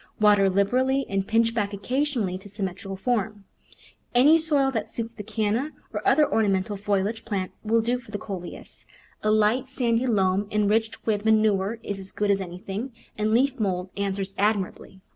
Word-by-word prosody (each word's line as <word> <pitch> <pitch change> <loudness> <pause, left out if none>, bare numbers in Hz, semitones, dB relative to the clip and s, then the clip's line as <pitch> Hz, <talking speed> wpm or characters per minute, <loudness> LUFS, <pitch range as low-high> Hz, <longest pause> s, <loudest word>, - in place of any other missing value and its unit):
Water 205 -2 +5
liberally 255 +8 +2
and 195 -1 -1
pinch 230 +1 +2
back 205 -3 -1
oc 200 - -12
casionally 250 -9 -1
to 205 - -11
symmetrical 195 -1 -5
form. 210 -1 -2 0.7
Any 295 +7 +6
soil 290 -4 +2
that 220 -5 -3
suits 230 0 -2
the 220 - -8
Canna, 220 +7 -1 0.2
or - - -2
other 300 - +5
ornamental 205 -2 +1
foliage 205 +2 -1
plant, 195 -5 -3
will 225 +1 +2
do 240 +2 0
for 235 - -17
the 210 - -4
Coleus 185 -3 -8 0.2
— - - -31
a 215 - 0
light, 215 +5 +2
sandy 245 -1 0
loam 195 -3 +2
enriched 210 +1 0
with 210 -2 0
manure 215 -1 +2
is 200 -1 -4
as 190 0 -4
good 205 -1 +1
as 195 -1 +1
anything, 190 +7 -6 0.2
and 215 0 0
leaf 265 +3 +2
mould 185 -3 -1
an 200 -1 -1
swers 195 0 -4
admirably. 200 -2 -1
210 Hz, 180 wpm, -25 LUFS, 195-230 Hz, 0.7 s, Any